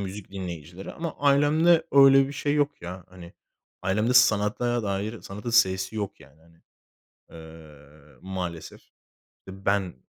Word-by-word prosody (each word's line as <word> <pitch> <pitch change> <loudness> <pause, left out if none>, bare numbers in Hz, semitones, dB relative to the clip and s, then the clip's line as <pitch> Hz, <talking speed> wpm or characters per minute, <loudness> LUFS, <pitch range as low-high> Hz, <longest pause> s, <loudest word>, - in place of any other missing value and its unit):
müzik 100 0 -7
dinleyicileri 90 -1 -8
ama 165 -1 -6
ailemde 145 +4 +3
öyle 135 -1 +6
bir - - -7
şey 145 +1 -2
yok 145 -6 -1
ya, 90 +1 -8
hani. 90 -1 -13 0.5
Ailemde 105 +6 0
sanata 120 +1 +2
dair, 105 +2 -3
sanatın 105 +4 -7
s'si 95 -4 +2
yok 100 -2 -5
yani, 75 +4 -19
hani, 85 0 -25 0.7
eee, 75 -2 -15
maalesef. 90 -3 -6 0.7
Eee, 95 - -8
ben, 95 -5 0
100 Hz, 130 wpm, -25 LUFS, 85-125 Hz, 0.7 s, öyle